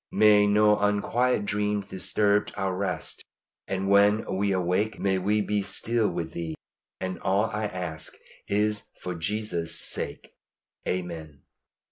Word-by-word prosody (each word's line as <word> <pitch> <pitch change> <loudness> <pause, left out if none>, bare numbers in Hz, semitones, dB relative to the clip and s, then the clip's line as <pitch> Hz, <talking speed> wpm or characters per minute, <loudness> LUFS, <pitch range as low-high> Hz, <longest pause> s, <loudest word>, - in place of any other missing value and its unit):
May 105 -1 +6
no 105 0 +4
unquiet 105 +3 +1
dreams 105 0 0
disturb 100 +2 +1
our 95 -2 -1
rest, 100 +1 -3 0.4
and 95 0 -2
when 100 +2 +4
we 100 +1 +1
awake 95 +4 0
may 95 -1 +1
we 105 +3 +1
be 105 0 0
still 115 +2 0
with 85 -2 -4
Thee. 80 -2 -4 0.4
And 95 0 -4
all 100 +3 +1
I 105 +1 -2
ask 90 -6 -5 0.3
is 105 +1 0
for 90 - -4
Jesus' 85 0 -2
sake. - - -4 0.5
Amen. 80 -6 -4
100 Hz, 130 wpm, -27 LUFS, 90-105 Hz, 0.5 s, May